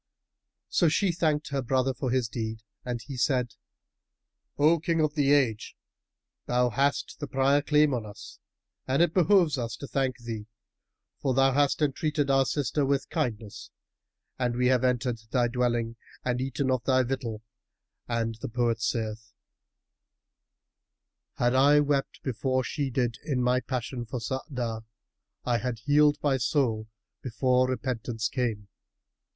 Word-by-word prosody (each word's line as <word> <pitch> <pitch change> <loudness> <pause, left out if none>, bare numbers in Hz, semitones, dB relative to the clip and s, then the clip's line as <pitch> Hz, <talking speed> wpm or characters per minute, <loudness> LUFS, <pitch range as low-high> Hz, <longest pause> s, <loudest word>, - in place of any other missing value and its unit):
So 170 - +3
she 190 +4 +2
thanked 155 -3 0
her 140 -1 -1
brother 130 +1 +1
for 130 0 -3
his 125 -1 +1
deed 110 0 -5 0.2
and 120 -1 -3
he 135 - -7
said, 125 -2 +1 1.0
"O 155 +3 +4
King 165 +1 0
of 155 -1 +2
the 145 -2 +2
Age, 125 -7 +1 0.7
thou 125 0 +2
hast 140 +5 0
the 145 - -4
prior 135 +2 +2
claim 150 -1 +3
on 120 -3 -1
us 105 - -11 0.5
and 135 +5 +3
it 175 - +1
behoves 175 -5 +4
us 115 -2 -3
to - - -7
thank 130 0 -1
thee, 115 -3 -6 0.7
for 135 -3 0
thou 135 0 +4
hast 145 +2 +2
entreated 145 0 0
our 135 -1 +3
sister 145 0 0
with 140 0 0
kindness 115 - -3 0.7
and 120 -2 0
we 125 +1 +2
have 130 -1 +3
entered 125 -2 0
thy 120 -1 +2
dwelling 120 -1 -1 0.3
and 125 0 0
eaten 135 0 -1
of 130 -3 0
thy 130 0 +3
victual; 120 -4 -4 0.6
and 115 -1 -2
the - - -4
poet 120 -1 0
saith[FN#314], 110 -1 -3 2.0
'Had 120 0 +1
I 140 +3 +5
wept 145 -1 -1
before 130 +1 0
she 140 +2 -2
did 120 -2 -1
in 135 -5 -1
my 125 +1 +3
passion 125 -2 -4
for 125 - -4
Saada, 120 -1 -4 0.3
* - - -46
I 120 - +2
had 125 -2 -3
healed 145 +5 +3
my 140 -3 +2
soul 120 -4 0 0.3
before 125 +1 +1
repentance 120 -3 -2
came. 115 -6 -2
130 Hz, 150 wpm, -27 LUFS, 120-140 Hz, 2.0 s, I